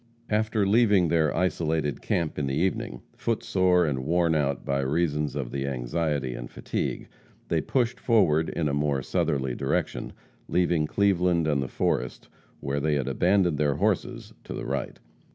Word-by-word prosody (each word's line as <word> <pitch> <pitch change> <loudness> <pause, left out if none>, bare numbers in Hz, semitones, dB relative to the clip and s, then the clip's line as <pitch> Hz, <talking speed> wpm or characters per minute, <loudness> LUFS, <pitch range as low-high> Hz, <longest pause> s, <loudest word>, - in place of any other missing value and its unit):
After 110 -1 +1
leaving 100 -3 +4
their 80 -2 +2
isolated 80 -4 0
camp 85 -4 -1
in 70 - -1
the 65 - -1
evening, 80 -7 -1
foot 115 -2 -2
sore 90 -2 +3
and 70 -4 -1
worn 85 +2 +2
out 70 -3 0
by 70 0 0
reason 75 +1 0
of 65 -4 -4
the 70 0 -3
anxiety 70 +1 -1
and - - -7
fatigue, - - -3 0.4
they - - +1
pushed 125 -2 0
forward 80 -10 +3
in 80 -3 -1
a 70 - -1
more 70 -2 0
southerly 65 -1 0
direction, - - -2 0.4
leaving 85 -3 +1
Cleveland 90 -3 +2
and 75 -3 +1
the 65 - -2
forest 60 0 -2 0.3
where 70 +1 -1
they 75 +1 +1
had 70 -3 -1
abandoned 90 +3 +2
their 75 -2 +2
horses - - -1
to - - -6
the - - -5
right. 70 -2 -3
75 Hz, 165 wpm, -26 LUFS, 70-90 Hz, 0.4 s, leaving